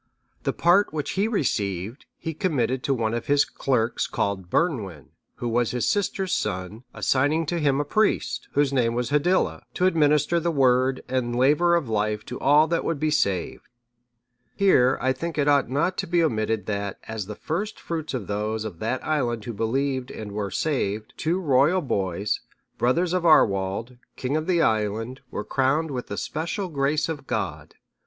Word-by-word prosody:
The - - 0
part 175 +4 +3
which 150 -2 -3
he 200 +3 +1
received, 105 - -2
he 160 - -5
committed 135 -7 0
to 140 - +2
one 110 -2 -1
of 120 - -3
his 145 0 +4
clerks 120 -3 0
called 95 -3 -2
Bernwin, 100 - -1 0.3
who 120 - -4
was 120 0 +1
his 125 -1 -1
sister's 195 -2 0
son, 95 +6 -3
assigning 145 +5 +1
to 170 +3 -1
him 140 -3 +2
a 145 - 0
priest, 215 +8 0
whose 145 -1 +2
name 120 -3 +1
was 125 +2 -2
Hiddila, 175 +6 +2
to 180 - +1
administer 155 -1 +3
the 170 +1 -1
Word 130 -3 +2
and 125 -2 -1
laver 150 +7 +4
of 165 -6 0
life 105 -1 -1
to 125 - -6
all 150 +2 +5
that 165 +1 -1
would 165 -4 -2
be 155 +1 +1
saved. 100 - -1 0.9
Here 135 -10 +4
I 130 0 +1
think 165 +3 -5
it 145 -1 +1
ought 140 -4 +3
not 165 +8 0
to - - -2
be 170 0 +2
omitted 110 - 0
that, 100 -1 -3
as 110 -3 -4
the 105 - -6
first 200 - -4
fruits 160 -4 -4
of 115 -6 -4
those 105 +2 -2
of 95 -6 -7
that 120 +4 -2
island 120 -8 -1
who 120 - -4
believed 130 +4 -1
and 105 -2 -7
were 100 -1 -3
saved, 110 -6 -2
two 170 +4 0
royal 150 +2 +3
boys, 100 -5 -1 0.4
brothers 165 +9 +2
to 185 - +2
Arwald, 110 - +2 0.2
king 130 +3 -2
of 155 0 -1
the 175 -3 +3
island,(637) 110 +2 0
were - - -4
crowned 145 +4 +1
with 125 -2 -4
the 100 - -5
special 170 - -3
grace 145 0 0
of 150 -4 -5
God. - - -4
130 Hz, 180 wpm, -25 LUFS, 110-160 Hz, 0.9 s, all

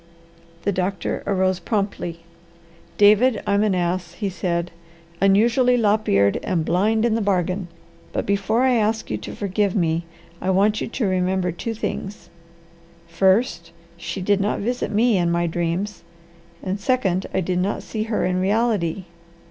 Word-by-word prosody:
The 200 - +1
doctor 185 0 -2
arose 185 -2 +1
promptly. 195 -6 -3 0.8
"David, 215 +3 +5
I'm 200 0 +2
an 210 -3 +2
ass," 175 0 -1
he 200 -3 -3
said. 175 -1 -2 0.5
"Unusually 235 +6 +4
lop 215 -1 +2
eared, 100 0 +3
and 165 -4 -1
blind 215 +6 +2
in 235 - +2
the 225 - 0
bargain. 185 -2 0 0.4
But - - -2
before 200 +4 +1
I 260 -1 +4
ask 220 0 0
you - - -1
to - - -8
forgive 200 0 -1
me, 165 -3 0 0.4
I 185 - -1
want 205 +3 +2
you - - -2
to 235 0 -2
remember 185 -1 0
two 225 +7 -5
things: 205 -2 -5 0.8
First, 190 -1 +1 0.3
she 180 +2 -5
did 200 +1 +2
not 205 - 0
visit 245 +4 -2
me 220 0 +3
in 175 -1 +1
my 170 0 +1
dreams; 175 +3 -2 0.6
and, 190 +2 -2
second, 200 -5 0
I - - 0
did 180 0 -1
not 195 +3 -1
see 215 - -4
her 225 -1 -1
in 185 0 0
reality. 200 -3 0
195 Hz, 155 wpm, -22 LUFS, 180-215 Hz, 0.8 s, David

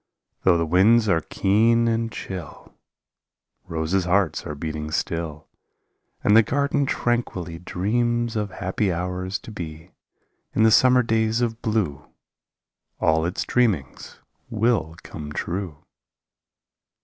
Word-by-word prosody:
Though 90 -2 +4
the 85 - 0
winds 105 +7 +4
are 85 -5 +3
keen 115 +7 +2
and 115 0 0
chill 90 -8 -8 0.9
Roses' 85 +3 -1
hearts 90 -2 +1
are 75 - -5
beating 75 0 -5
still, 80 -1 -3 0.8
And 105 - +4
the 115 - +9
garden 140 +3 0
tranquilly 95 -11 -2
Dreams 120 +6 -1
of 105 -1 -1
happy 95 +1 -1
hours 90 +2 -3
to 110 - -12
be 80 -3 -8 0.3
— - - -49
In 110 - +4
the 110 - +6
summer 125 +2 +5
days 110 0 +1
of 115 -1 -2
blue 105 -11 -1 0.9
All 80 +1 +2
its 90 - -2
dreamings 105 - -1 0.3
will 110 -7 0
come 75 -2 -8
true. 90 -3 -4
95 Hz, 125 wpm, -23 LUFS, 85-115 Hz, 0.9 s, the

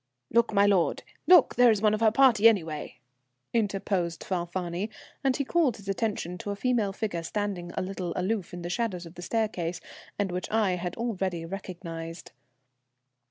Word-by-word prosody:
"Look, 235 +1 +3
my 200 -1 +4
lord, 195 -4 +2 0.2
look, 360 - +7
there's 240 -4 +5
one 215 0 +3
of 215 - 0
her 225 - +6
party, 230 -3 +6
anyway," 160 - -2 0.6
interposed 195 -6 -1
Falfani, 175 +2 -3 0.3
and 265 -2 +2
he 280 - -1
called 300 -7 +2
his 200 - -14
attention 195 -4 -2
to 205 - -6
a 200 - -1
female 225 -2 +1
figure 195 -4 -3
standing 185 -1 -3
a - - 0
little 185 -2 -4
aloof 190 +1 -1
in 175 -1 -7
the 175 - -4
shadow 230 -3 -1
of 165 - -11
the 175 - -10
staircase, 180 -5 -1 0.4
and 200 -3 -1
which 180 0 -3
I 215 -3 +2
had 180 -1 -3
already 190 -7 -2
recognized. 170 -2 -7
195 Hz, 165 wpm, -28 LUFS, 175-220 Hz, 0.6 s, look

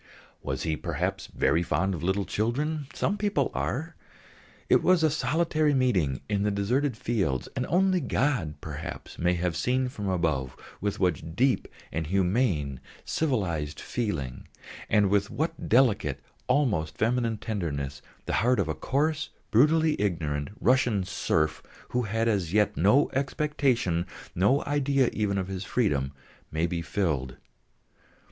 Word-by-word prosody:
Was 65 0 -3
he, 80 -1 0
perhaps, - - -3
very 80 - +1
fond 85 +3 0
of 85 - -5
little 95 +3 0
children? 145 +7 -1
Some 205 - -1
people 205 -1 +1
are. - - -2 0.7
It - - +5
was 180 -3 +4
a 155 - +4
solitary 155 -1 +1
meeting 95 - +1
in 100 +3 0
the 105 - +2
deserted 115 +6 0
fields, 95 - -1
and 125 -1 -1
only 185 +1 +3
God, 125 - 0
perhaps, - - -7
may 90 +1 +2
have 85 -1 -1
seen 125 +9 +1
from 105 -6 -4
above 80 -8 -1 0.2
with 100 0 -2
what 80 -3 0
deep 130 +3 +2 0.2
and 80 -1 -2
humane 90 - +1 0.3
civilised 90 - -1
feeling, 80 - -3 0.4
and 100 -2 +3
with 100 0 +2
what 165 +2 -3
delicate, 105 - +3 0.3
almost 105 - +1
feminine 115 0 +1
tenderness, 70 -11 -3 0.2
the - - -2
heart 125 0 +3
of 95 - +1
a 80 - -1
coarse, 150 - 0 0.2
brutally 155 +4 +4
ignorant 75 -7 -1
Russian 125 -5 +3
serf, 80 -3 0 0.3
who 125 - 0
had 115 +1 0
as 95 -6 0
yet 105 -1 +3
no 105 - +4
expectation, 135 - 0 0.3
no 105 +11 +3
idea 140 -2 +2
even 100 -2 0
of 95 -1 -1
his 95 0 -4
freedom, 70 - 0 0.4
may 80 +2 +1
be 85 0 -2
filled. 75 -8 -1
105 Hz, 140 wpm, -27 LUFS, 85-130 Hz, 0.7 s, It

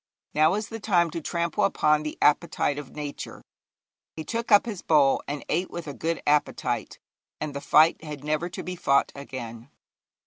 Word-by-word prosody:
Now 155 +4 +4
is 210 0 -3
the 225 - -6
time 175 -6 +2
to 165 - -4
trample 170 +1 -1
upon 150 0 +3
the 150 0 -5
appetite 145 0 +2
of 140 -3 -10
nature.' 145 -1 -7 0.7
He 160 - -5
took 230 +6 -4
up 205 +1 +7
his 210 -6 -5
bowl, 145 -4 +4
and 145 0 -5
ate 180 +4 0
with 170 -1 -6
a 145 - -5
good 165 +4 -3
appetite, 150 0 0 0.4
and 150 -1 -4
the 140 - -5
fight 160 +2 +4
had 150 -3 -7
never 155 +3 -1
to 180 - -7
be 180 - -5
fought 140 -5 +2
again. 120 -3 -8
155 Hz, 180 wpm, -26 LUFS, 145-170 Hz, 0.7 s, up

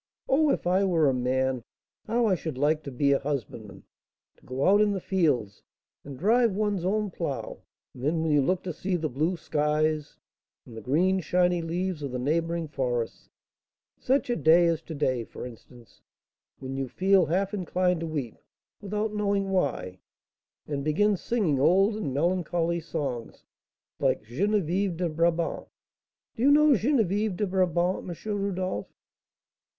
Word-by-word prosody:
Oh, 300 +3 +3
if - - 0
I 185 +3 +3
were 170 -6 +3
a 135 - +3
man, 130 0 0 0.5
how 235 +2 +1
I 210 - +3
should 160 -6 -4
like 150 +3 +2
to 140 - -5
be 140 +2 +1
a 140 - +3
husbandman, 110 -8 -5 0.5
to - - -27
go 130 +2 -1
out 205 +2 +5
in 210 -1 +3
the 195 - -2
fields, 145 - 0 0.4
and 140 -2 -9
drive 225 - +3
one's 205 -3 0
own 205 +2 0
plough; 165 -6 -4 0.3
and 125 - -11
then 160 +3 +1
when 160 - 0
you 145 -1 +4
look 180 +6 0
to 180 - -4
see 185 +4 -2
the 160 -3 -1
blue 160 +8 0
skies, 150 0 -1 0.5
and 115 - -12
the 110 - -7
green 180 +8 +2
shiny 180 0 +1
leaves 175 0 -3
of 140 -2 -4
the 125 - -3
neighbouring 165 +5 -1
forests, 125 -5 -3 0.7
such 260 -1 +1
a - - +1
day 170 -1 +5
as 165 -1 +1
to 160 -1 -8
day, 130 -5 0
for - - -9
instance, 120 -2 -14 0.6
when 135 0 -6
you 135 -1 -2
feel 190 +4 +3
half 190 +5 0
inclined 180 -2 0
to 165 - -4
weep, 145 -8 -4 0.4
without 210 +1 -2
knowing 200 -2 0
why, 140 - -1 0.7
and 140 -2 -3
begin 200 +8 +2
singing 185 - 0
old 195 +9 +4
and 185 -11 -3
melancholy 170 +2 0
songs, 140 -7 -5 0.6
like - - +1
'Geneviève 185 - 0
de 175 0 0
Brabant.' 165 +1 0 0.7
Do 230 - -6
you 270 - +5
know 300 +1 +6
'Geneviève 215 - +1
de 210 - 0
Brabant,' 180 -1 0
M. 205 +4 -4
Rodolph?" 185 - -2
170 Hz, 165 wpm, -27 LUFS, 140-195 Hz, 0.7 s, know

